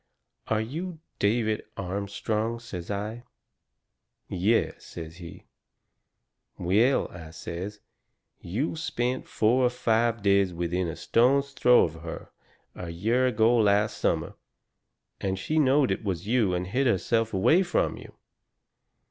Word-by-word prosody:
"Are 110 -1 +1
you 160 +9 -5 0.2
David 110 +1 +1
Armstrong?" 100 +4 -2
says 95 -7 -8
I. 105 +3 -3 1.1
"Yes," 100 +5 0
says 80 0 -9
he. 85 -2 -11 1.1
"Well," 105 +10 +2
I 80 -3 -10
says, 90 +6 -7 0.6
"you 120 - -2
spent 130 -6 -2
four 120 +4 +2
or 125 - +4
five 115 -2 +1
days 100 -3 +3
within 85 +1 -1
a 80 - -4
stone's 140 +4 +2
throw 125 -2 +5
of 80 -1 -3
her 85 0 -8 0.4
a 90 - -7
year 115 +10 +1
ago 115 0 +3
last 105 0 +2
summer, - - 0 0.9
and 95 -1 -1
she 155 +11 0
knowed 140 -1 +4
it - - -2
was 95 -3 -3
you 110 -5 +2
and 90 +1 -2
hid 130 +9 0
herself 115 +2 +1
away 130 - +4
from 180 -2 0
you." - - -12
110 Hz, 130 wpm, -27 LUFS, 95-125 Hz, 1.1 s, throw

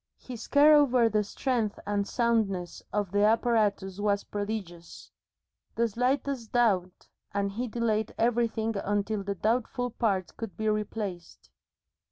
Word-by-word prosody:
His 245 -3 -9
care 295 +2 +6
over 255 -6 +5
the 210 -1 +1
strength 225 0 -1
and 205 -1 -1
soundness 215 -7 0
of 205 -3 -1
the 205 0 +2
apparatus 210 -3 +2
was 205 -1 +1
prodigious. 200 -5 -6 0.6
The 235 0 +2
slightest 250 +1 -1
doubt, 195 -7 +1 0.3
and 200 0 0
he 240 +5 -3
delayed 220 -2 -1
everything 225 -1 +1
until 205 +1 -1
the 200 0 -3
doubtful 245 +4 -1
part 195 -6 -1
could 225 -4 -7
be 220 - -2
replaced. 210 -5 -4
215 Hz, 130 wpm, -28 LUFS, 200-235 Hz, 0.6 s, care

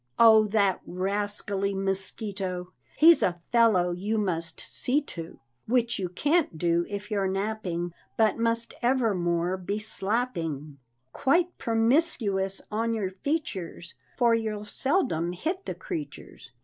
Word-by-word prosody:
Oh, 220 -2 +7
that 200 -3 +2
rascally 200 +1 -1
mosquito! 190 -1 -3 0.2
He's 330 +2 +7
a 175 -1 +1
fellow 220 -7 +4
you 200 +5 -2
must 165 -5 -2
see 265 +4 0
to; 165 - -8 0.3
Which 235 -1 +1
you 185 -2 -2
can't 290 - +1
do 170 +1 +1
if 205 +2 -6
you're 200 -2 +1
napping, 190 -3 -2 0.2
But 220 0 +3
must 230 0 0
evermore 185 -8 +1
be 195 +3 -3
slapping 190 - -3 0.3
Quite 345 +6 +2
promiscuous 225 - +1
on 230 +2 0
your 195 -4 -2
features; 190 - -4 0.2
For 240 -3 +4
you'll 215 -2 -1
seldom 205 - 0
hit 340 - -3
the - - -3
creatures. 320 -5 -7
205 Hz, 125 wpm, -27 LUFS, 180-230 Hz, 0.3 s, Oh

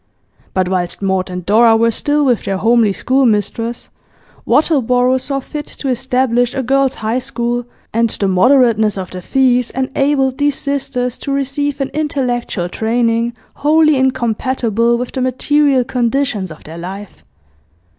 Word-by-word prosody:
But 185 -1 +1
whilst 180 +1 -2
Maud 190 -1 0
and 180 -1 -6
Dora 225 +3 +5
were 230 +1 +2
still 290 +5 0
with 245 -4 +1
their 195 - -1
homely 225 +1 +3
schoolmistress, 230 -1 0 0.6
Wattleborough 255 -4 +2
saw 275 +1 -2
fit 295 +2 -7
to 275 - -3
establish 250 -1 0
a 265 - -1
Girls' 270 +1 +1
High 230 +4 +1
School, 240 -1 -3 0.3
and 230 +1 +2
the 200 - -2
moderateness 220 +1 +3
of 185 - -6
the 185 - -7
fees 250 +2 +2
enabled 265 0 0
these 290 -1 +2
sisters 270 -3 -2
to 280 - -4
receive 280 +1 -2
an 270 - -1
intellectual 250 - -2
training 230 +3 0 0.2
wholly 305 +1 +3
incompatible 235 -2 0
with 245 +1 -4
the 260 - -3
material 270 +1 +2
conditions 245 -4 -1
of 155 - -12
their 165 +2 -9
life. 190 +3 -8
245 Hz, 145 wpm, -16 LUFS, 220-270 Hz, 0.6 s, Dora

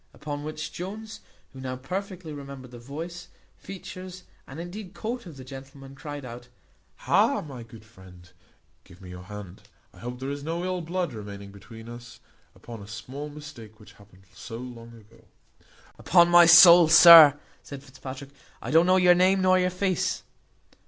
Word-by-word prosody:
Upon 145 -1 -7
which 155 0 -7
Jones, 215 +5 -8 0.3
who 130 - -11
now 130 -1 -5
perfectly 180 +4 -7
remembered 140 -3 -10
the 120 - -11
voice, 165 +8 -8 0.3
features, 185 -1 -10 0.2
and 135 +4 -10
indeed 185 +3 -9
coat, 235 -1 -6
of 155 -5 -12
the 130 - -10
gentleman, 135 +1 -12
cried 145 0 -9
out 120 0 -10 0.6
"Ha, - - +2
my 135 -6 -10
good 115 -1 -14
friend! 95 -4 -17 0.6
give 90 - -18
me 90 -2 -12
your 90 0 -11
hand; 100 -2 -10 0.3
I 95 - -18
hope 125 +3 -8
there 135 +1 -5
is 140 0 -7
no 165 +3 -4
ill 185 -1 -3
blood 175 0 -4
remaining 100 -2 -9
between 110 +3 -14
us, 120 +1 -12 0.4
upon 115 -3 -11
a 100 - -12
small 135 +7 -8
mistake 145 -8 -12
which 105 - -17
happened 100 -2 -21
so 115 -1 -9
long 115 -1 -11
ago." 115 0 -20 0.8
"Upon 175 -1 +4
my 175 -1 +7
soul, 170 0 +9
sir," 160 -2 +9 0.2
said 140 -1 -11
Fitzpatrick, 135 0 -10 0.3
"I - - -7
don't 165 +3 +4
know 185 0 +4
your 180 -1 +5
name 185 +2 +2
nor 185 0 +4
your 180 0 +1
face." 185 0 -2
140 Hz, 170 wpm, -25 LUFS, 115-175 Hz, 0.8 s, soul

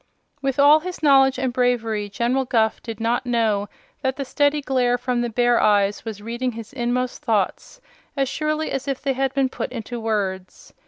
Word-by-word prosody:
With 270 -2 -1
all 290 +2 +7
his 355 0 -7
knowledge 270 -2 +5
and 260 -2 -1
bravery 230 -4 0
General 240 +6 0
Guph 225 -3 +1
did 225 -2 -7
not 230 +2 0
know 220 -4 +1 0.3
that 265 -1 -1
the 275 - -4
steady 290 +2 +1
glare 255 -3 +1
from 245 -1 -1
the 240 - -1
bear 240 +1 +2
eyes 205 -1 +2
was 215 -3 -7
reading 240 +2 -3
his 225 +2 -9
inmost 250 0 -2
thoughts 220 - -1 0.4
as 270 -1 +1
surely 305 +2 -2
as 270 +1 -3
if 275 -2 -2
they 275 -1 -1
had 270 0 0
been 270 -1 +2
put 255 - -5
into 240 0 -6
words. 195 -4 -3
245 Hz, 190 wpm, -22 LUFS, 225-270 Hz, 0.4 s, all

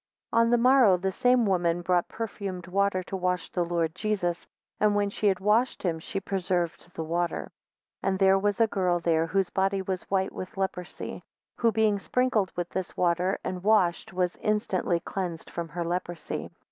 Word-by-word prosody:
16 230 - +4
On 230 - +3
the 240 - +4
morrow, 245 -5 +6
the 190 +2 -1
same 245 +4 +3
woman 175 -3 +1
brought 180 -1 +2
perfumed 200 -5 -5
water 190 0 +1
to 195 - -6
wash 180 -2 -1
the 175 - 0
Lord 170 -2 -1
Jesus; 180 -3 -2 0.3
and 210 -1 +3
when 205 -1 +1
she 210 - 0
had 190 -2 +2
washed 215 +6 +2
him, 165 -4 0
she 195 - -4
preserved 180 -3 -2
the 160 - -3
water. 170 +2 -2 0.5
17 - - +2
And 190 - 0
there 195 0 +5
was 205 +1 0
a 230 - +6
girl 185 -5 0
there, 165 -1 +1
whose 195 +1 0
body 195 0 +1
was 190 -1 -4
white 190 -1 +1
with 185 +3 -8
a - - -5
leprosy, 180 -2 -4 0.4
who 230 -1 +3
being 215 -1 +2
sprinkled 230 -3 +1
with 175 -1 -3
this 185 -2 -4
water, 180 +2 +1
and 180 -1 -4
washed, 195 -5 +2
was 180 -1 -1
instantly 210 -5 0
cleansed 175 -3 -4
from 170 -1 -4
her 170 +2 -3
leprosy. 175 0 -4
190 Hz, 190 wpm, -27 LUFS, 175-205 Hz, 0.5 s, morrow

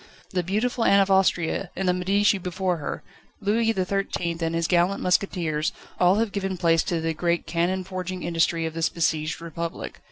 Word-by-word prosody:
The 185 - 0
beautiful 220 +7 -1
Anne 200 -2 +5
of 195 0 +2
Austria, 190 -1 +2
and 190 0 -2
the 180 - +4
Medici 195 +3 +2
before 180 0 -1
her, 150 - -5 0.4
Louis 225 +3 +2
XIII, 190 -3 -1
and 165 0 -1
his 165 0 0
gallant 180 +2 +2
musketeers 170 -5 0 0.3
all 180 +1 +5
have 220 0 0
given 195 -2 -2
place 165 -2 +3
to 170 - -1
the 160 0 -1
great 170 +1 0
cannon 175 +3 0
forging 185 -1 -5
industry 165 0 +1
of 160 - -3
this 165 0 0
besieged 155 -2 -1
Republic. 170 +1 -5
180 Hz, 180 wpm, -25 LUFS, 165-195 Hz, 0.4 s, Anne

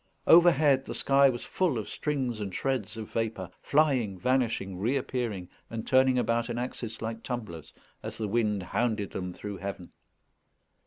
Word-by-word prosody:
Overhead 150 -5 +6
the - - -6
sky 140 0 +5
was 120 -2 -3
full 175 -9 0
of 110 - -4
strings 130 -7 -2
and 100 -2 -4
shreds 130 -5 -2
of 110 -1 -7
vapour, 110 -5 -3
flying, 135 -10 +2
vanishing, 115 -4 0
reappearing, 120 -4 -2 0.2
and 115 -1 -5
turning 130 -1 +4
about 115 0 +1
an 120 - -3
axis 115 -2 -5
like 115 0 -4
tumblers, 110 - -6 0.3
as - - -6
the 110 - -2
wind 105 -2 0
hounded 110 +1 -1
them 90 -1 -4
through 100 +2 -7
heaven. 95 -3 -6
115 Hz, 155 wpm, -28 LUFS, 105-130 Hz, 0.3 s, Overhead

